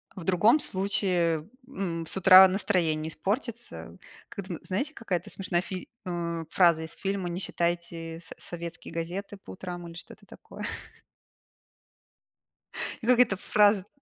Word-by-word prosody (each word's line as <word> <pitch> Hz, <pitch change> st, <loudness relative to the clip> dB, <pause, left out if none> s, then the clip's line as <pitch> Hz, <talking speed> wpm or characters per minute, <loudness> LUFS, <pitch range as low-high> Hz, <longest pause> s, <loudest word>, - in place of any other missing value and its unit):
В 185 Hz, -, -7 dB
другом 190 Hz, -, +4 dB
случае, 180 Hz, -, 0 dB, 0.2 s
м, 180 Hz, -10 st, -3 dB
с 160 Hz, -, -3 dB
утра 190 Hz, 0 st, +10 dB
настроение 175 Hz, -5 st, 0 dB
испортится. 230 Hz, -, -4 dB, 0.3 s
Кэтм 200 Hz, -6 st, -6 dB
знаете, 270 Hz, +11 st, -2 dB
какая-то 185 Hz, -, -3 dB
смешная 180 Hz, -3 st, -1 dB
фи 185 Hz, 0 st, -7 dB, 0.2 s
а, 170 Hz, -2 st, -3 dB
фраза 170 Hz, -3 st, +4 dB
из 160 Hz, -, -8 dB
фильма: 195 Hz, -2 st, -2 dB
"Не 170 Hz, +1 st, -3 dB
читайте 170 Hz, -2 st, -2 dB
со 165 Hz, -, -10 dB
советские 170 Hz, -1 st, -7 dB
газеты 180 Hz, +5 st, -4 dB
по 195 Hz, -, -12 dB
утрам",- 175 Hz, -2 st, -7 dB
или 165 Hz, -, -10 dB
что-то 170 Hz, -, -12 dB
такое. -, -, -11 dB, 2.4 s
И 225 Hz, -, -6 dB
как 250 Hz, -1 st, +5 dB
эта 225 Hz, -6 st, +5 dB
фраза. 205 Hz, -1 st, +3 dB
185 Hz, 135 wpm, -28 LUFS, 170-200 Hz, 2.4 s, утра